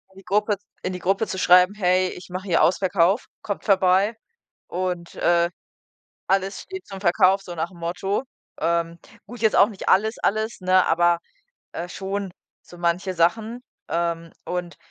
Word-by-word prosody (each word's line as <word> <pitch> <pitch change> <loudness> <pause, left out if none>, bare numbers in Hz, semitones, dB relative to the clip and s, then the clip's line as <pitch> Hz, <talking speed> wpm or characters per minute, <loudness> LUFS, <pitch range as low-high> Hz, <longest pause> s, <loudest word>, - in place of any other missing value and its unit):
die 195 - -14
Gruppe 210 +2 +1 0.3
in 185 - -3
die 180 - -5
Gruppe 195 +5 0
zu 190 - -4
schreiben: 180 +2 +6
„Hey, 185 -2 +2
ich 180 - -10
mache 185 +2 -6
hier 170 - +3
Ausverkauf, 185 +3 +2 0.2
kommt 200 - -4
vorbei 195 +2 +3 0.5
und, 180 -1 -3
äh, 170 0 +2 0.8
alles 195 0 0
steht 380 -1 -9
zum 195 -1 -8
Verkauf“, 190 +1 +3
so 175 -2 -8
nach 165 +3 -2
dem 175 - -15
Motto. 180 +6 -2 0.4
Ähm, 170 0 0 0.3
gut, 240 +1 -10
jetzt 220 -2 +3
auch 205 - +6
nicht 200 -4 -7
alles, 220 +4 +3
alles, 215 +1 -1
ne, 185 0 +3
aber 175 +1 +3 0.7
schon 195 0 -4 0.3
so 175 - -15
manche 175 +2 0
Sachen. 220 +8 +1 0.3
Ähm, 170 -1 -2
und 180 -1 -4
185 Hz, 155 wpm, -23 LUFS, 175-200 Hz, 0.8 s, schreiben